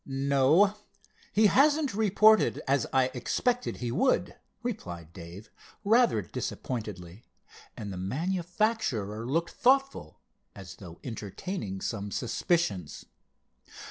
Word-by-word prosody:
"No, 140 +9 +3 0.5
he 215 +2 +4
hasn't 285 +4 +4
reported, 215 +1 +4
as 135 -2 +2
I 130 -1 +2
expected 245 - -1
he 120 -1 -3
would," 255 - +1 0.3
replied 85 - -6
Dave 85 +4 -11 0.3
rather 220 - +3
disappointedly, 100 -1 -6 0.5
and 100 -3 -6
the - - -6
manufacturer 160 - -1
looked 165 +6 0
thoughtful 270 - +1 0.4
as 95 -1 -10
though 85 -4 -11
entertaining 110 - -5
some 105 -3 -3
suspicions. 115 - -1
135 Hz, 100 wpm, -28 LUFS, -, 0.5 s, he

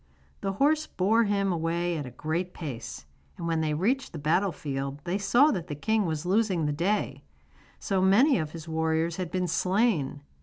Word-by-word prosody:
The 195 -1 -2
horse 300 +8 +2
bore 220 +5 +2
him 200 -1 +1
away 170 +1 -1
at 145 -4 -4
a - - -6
great 160 +8 -3
pace, 120 - -6 0.3
and - - -5
when 165 -1 0
they 155 -1 0
reached 245 - 0
the - - -5
battle 170 +6 +1
field 140 -2 -4
they 185 +4 -1
saw 245 +9 +4
that 175 -3 -3
the 150 - -4
king 215 +6 +1
was 160 0 -3
losing 190 -4 +1
the 150 - 0
day, 165 -4 -1 0.5
so 195 -2 -1
many 235 +9 +5
of 155 -2 -2
his 165 +1 -9
warriors 160 +1 0
had 180 -3 -3
been 180 +1 -1
slain. 180 - +1
175 Hz, 190 wpm, -27 LUFS, 155-200 Hz, 0.5 s, many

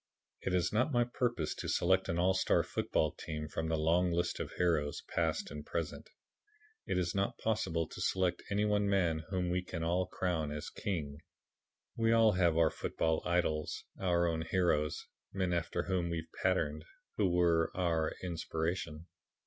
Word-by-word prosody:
It 90 - 0
is 85 0 +1
not 125 +7 +2
my 120 -2 +4
purpose 120 -9 -1
to - - -5
select 95 +2 +2
an 85 - 0
all 90 +2 +3
star 95 - +3
football 80 - 0
team 75 -1 -5
from 80 +1 -3
the 80 0 +1
long 85 +3 +3
list 85 0 0
of - - -4
heroes 80 -5 0
past 80 -2 0
and 75 0 -6
present. 80 +1 -4 0.8
It - - 0
is 90 -1 0
not 100 0 0
possible 85 -7 0
to - - -8
select 90 -2 +1
any 105 +1 +1
one 105 -1 +2
man 85 -5 +2
whom 90 -2 -1
we 90 +1 +1
can 85 -2 -5
all 90 +3 +1
crown 85 -4 -1
as 75 0 -5
king. 75 -7 -3 0.8
We 115 0 +2
all 115 -1 +6
have 85 -4 +2
our 80 -1 +4
football 80 -1 -1
idols, 85 -3 0 0.2
our 85 -2 +2
own 80 -1 0
heroes, 80 -2 +1 0.3
men 95 -2 0
after 85 -1 -1
whom 90 -3 -1
we 85 - -1
have - - -13
patterned, 75 -5 +1 0.3
who 100 -3 +3
were 85 -2 +3
our 85 -3 +1
inspiration. 85 -2 -3
85 Hz, 175 wpm, -33 LUFS, 80-95 Hz, 0.8 s, all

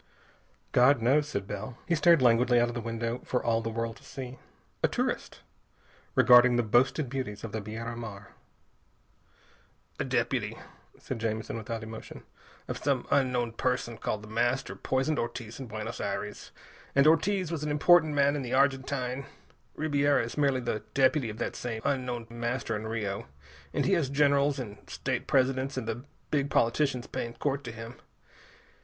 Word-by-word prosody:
"God 125 +2 +5
knows," 140 +6 +3
said 100 -10 -3
Bell. 105 +5 -6
He 175 - +1
stared 165 -2 +5
languidly 120 0 +5
out 120 0 +3
of - - -5
the 120 - -3
window, 115 +1 -3
for 125 - -1
all 115 -1 +2
the 115 - -3
world 115 0 -3
to - - -19
see. 130 -1 -8 0.4
A - - +4
tourist, - - -2 0.7
regarding 125 0 +7
the 120 - +3
boasted 125 +6 +2
beauties 125 -5 -4
of 115 - -5
the 110 - -3
Biera 115 +3 -5
Mar. 105 -4 -8 1.7
"A - - +1
deputy," - - -1 0.4
said 130 - -5
Jamison 110 0 -2
without 115 0 -4
emotion, 110 0 -9 0.4
"of - - -4
some 140 -3 0
unknown 125 -4 +2
person 125 0 -1
called 105 0 -2
The - - -10
Master 120 +4 0
poisoned 135 +4 0
Ortiz 115 0 -5
in 135 - -6
Buenos 110 +1 -5
Aires. 100 +1 -4 0.5
And 140 +1 +5
Ortiz 175 +3 +3
was 160 -3 -3
an 150 - -1
important 155 +1 +5
man 140 0 +4
in 145 - -2
the 125 -1 -2
Argentine. 135 -1 0 0.5
Ribiera 145 -2 +2
is 115 - -6
merely 140 -3 +2
the 120 -3 -2
deputy 135 -2 +3
of 105 - -7
that - - -3
same 115 -2 -4
unknown 125 -4 -1
Master 120 0 -2
in 110 +1 -4
Rio, 105 -5 -3 0.4
and - - 0
he 195 - +3
has 165 -7 +2
generals 140 0 +3
and 105 -6 -6
state - - -3
presidents 130 0 +1
and 120 -4 -3
the 120 +3 -4 0.3
big 140 -2 +1
politicians 125 +1 +1
paying 115 0 -5
court 140 -1 -1
to 120 - -5
him. 115 +2 -9
125 Hz, 170 wpm, -29 LUFS, 115-140 Hz, 1.7 s, regarding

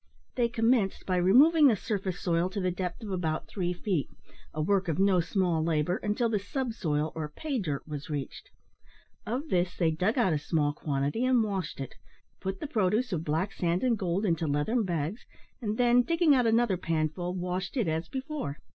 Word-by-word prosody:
They 235 -1 +1
commenced 225 -3 +1
by 185 -1 0
removing 285 - +6
the 235 - +4
surface 195 -3 -3
soil 170 0 +1
to 200 - -4
the 185 -1 0
depth 180 +4 -4
of 210 - -5
about 165 -4 -2
three 180 -3 -2
feet, 180 -3 -2 0.4
a 155 - -7
work 190 +4 +1
of 160 -2 -1
no 195 -1 +4
small 175 -2 +1
labour, 165 +2 +1
until 215 +3 0
the 220 -2 0
subsoil, 195 - -2
or 155 -2 -4
"pay 275 - -3
dirt," 150 -8 -3
was 145 -1 -6
reached. 145 -3 -5 0.8
Of 260 +8 -3
this 180 0 +1
they 165 -3 +2
dug 185 - 0
out 220 -9 +3
a 150 - 0
small 145 -1 0
quantity, 145 - -1
and 255 -2 +4
washed 195 -8 -3
it; 135 - -5 0.5
put 190 0 -4
the - - -4
produce 220 -2 +1
of 160 -2 -1
black 165 +6 -1
sand 175 +3 0
and 250 -2 +3
gold 190 0 -1
into 165 -4 0
leathern 150 +11 +1
bags, 170 +4 -2 0.4
and 215 -2 -2
then, 245 0 +5
digging 330 +2 +3
out 250 -3 +3
another 225 -4 +3
panful, 165 +2 -2
washed 180 +6 -3
it 230 - +1
as 160 +1 -2
before. 265 - -4
185 Hz, 190 wpm, -29 LUFS, 160-230 Hz, 0.8 s, removing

